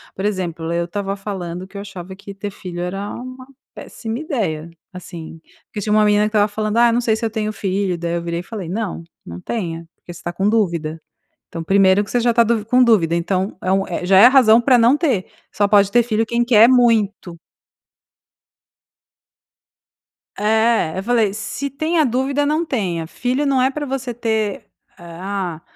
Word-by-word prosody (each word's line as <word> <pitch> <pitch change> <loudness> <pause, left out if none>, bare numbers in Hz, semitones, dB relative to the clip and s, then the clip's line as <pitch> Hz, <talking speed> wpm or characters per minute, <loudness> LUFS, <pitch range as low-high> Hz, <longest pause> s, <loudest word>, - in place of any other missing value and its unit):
Por 190 - -4
exemplo, 175 -5 -3
eu 170 0 0
estava 195 +2 -4
falando 185 -3 -6
que 200 - -11
eu - - -5
achava 190 -2 -9
que 200 0 -10
ter 200 +1 -6
filho 180 -3 -7
era 195 +3 -4
uma 255 +1 -9 0.3
péssima 225 0 -6
ideia, 200 - -3 0.2
assim, 170 -3 -10 0.3
porque 210 - -7
tinha 210 +1 -1
uma 215 0 +4
menina 210 0 +3
que 210 - +1
estava 210 -1 +2
falando: 215 +1 -3
"Ah, 235 0 +5
não 240 +1 +1
sei 220 -2 +1
se 230 - -7
eu 225 - +1
tenho 215 -1 -3
filho", 190 -3 -2
daí 170 0 -2
eu 170 - -2
virei 170 0 -3
e - - -6
falei: 200 -4 -7
"Não, 195 -3 -4 0.2
não 85 +1 -9
tenha, 165 - -5
porque 175 - -13
você 170 - -11
está 175 - -5
com 195 +3 0
dúvida. 170 -8 -1 0.5
Então, 165 - -6
primeiro 195 +2 +4
que 205 - -10
você 245 - +1
já 240 0 +1
está 235 0 +4
du 230 -1 0
com 250 +3 +4
dúvida, 175 -8 +3
então 185 +3 -2
é 185 - -1
um 195 0 +1
é, 175 0 -4
já 190 0 +5
é 215 - +9
a - - +6
razão 240 -4 +6
para 250 0 +4
não 235 +4 +5
ter, 265 - 0 0.3
só 205 0 +1
pode 200 -1 +4
ter 240 +1 +4
filho 225 -1 0
quem 240 0 0
quer 230 -1 +6
muito". 220 -8 +2 3.0
É. 220 -5 +1
Eu 190 - -3
falei: 225 -3 +1
"Se 220 +7 -4
tem 315 +5 -2
a - - +5
dúvida, 270 +3 0
não 310 +3 0
tenha. 180 - -2
Filho 255 - -2
não 270 -2 +2
é 260 - +3
pra 295 +1 -4
você 265 -2 -4
ter, 220 -3 -2 0.3
eh, 175 - -15
ah, 175 -1 -5
205 Hz, 205 wpm, -19 LUFS, 180-235 Hz, 3.0 s, é